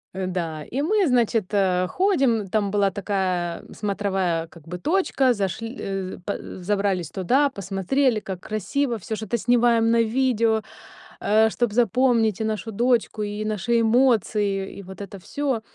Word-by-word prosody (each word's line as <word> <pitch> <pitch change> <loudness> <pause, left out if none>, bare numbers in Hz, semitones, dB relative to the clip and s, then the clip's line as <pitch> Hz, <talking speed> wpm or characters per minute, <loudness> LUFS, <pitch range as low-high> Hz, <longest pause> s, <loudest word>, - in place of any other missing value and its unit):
Э, 190 -1 -2
да, 165 -4 -3
и 270 - -3
мы, 390 +2 +2
значит, 235 -5 +2
э, 185 -2 +2
ходим, 270 - +1
там 205 0 0
была 200 -2 +2
такая 185 -3 -2
смотровая, 190 -5 -1
как 165 -1 -17
бы, 180 +1 -5
точка, 275 - +2
зашл 205 +2 -3
э, 195 -6 -5
п 200 - -1
э, - - -8
забрались 195 -2 -1
туда, 260 +10 +2
посмотрели, 210 +5 0
как 190 -3 -6
красиво, 230 +6 -2
всё 220 +4 -4
что-то 220 +2 -2
снимаем 235 -1 +3
на 230 0 +4
видео, 230 -2 +1 0.6
э, 220 +2 +4
чтобы 235 -2 -1
запомнить 230 -2 +2
и - - +1
нашу 220 0 -3
дочку, 230 -1 +1
и 205 +1 -3
наши 215 +3 +1
эмоции, 215 -5 +2
и - - -8
вот 190 +2 -10
это 200 0 -8
всё. 270 +2 -2
215 Hz, 155 wpm, -24 LUFS, 195-240 Hz, 0.6 s, на